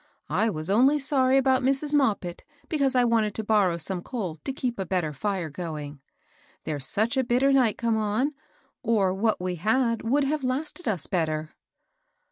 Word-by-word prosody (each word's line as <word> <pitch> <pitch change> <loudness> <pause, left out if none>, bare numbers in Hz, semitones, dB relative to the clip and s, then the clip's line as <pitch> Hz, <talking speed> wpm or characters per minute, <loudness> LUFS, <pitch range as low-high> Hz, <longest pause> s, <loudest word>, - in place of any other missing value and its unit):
I 210 +8 +2
was 155 -5 -4
only 255 +9 +4
sorry 270 -2 +3
about 265 -1 +3
Mrs. 275 +3 +1
Moppit 210 -11 0 0.3
because 280 -5 0
I 250 - +4
wanted 225 -3 +1
to 220 - -3
borrow 205 -5 +2
Bome 175 +2 +1
coal 185 -8 -5
to - - -2
keep 250 -4 -3
a - - 0
better 175 -5 -1
fire 185 0 -3
going. 150 -3 -6 0.6
There's 145 -4 -4
such 225 +6 0
a 265 - +3
bitter 255 +3 +2
night 250 -6 +3
come 230 -2 0
on, 220 +7 0 0.5
or 215 -6 +1
what 215 +3 0
we 180 0 -3
had 230 +6 +1
would 275 +6 +1
have 290 +1 -1
lasted 295 +7 -3
us 190 -8 +2
better." 155 -3 -2
220 Hz, 175 wpm, -26 LUFS, 180-265 Hz, 0.6 s, only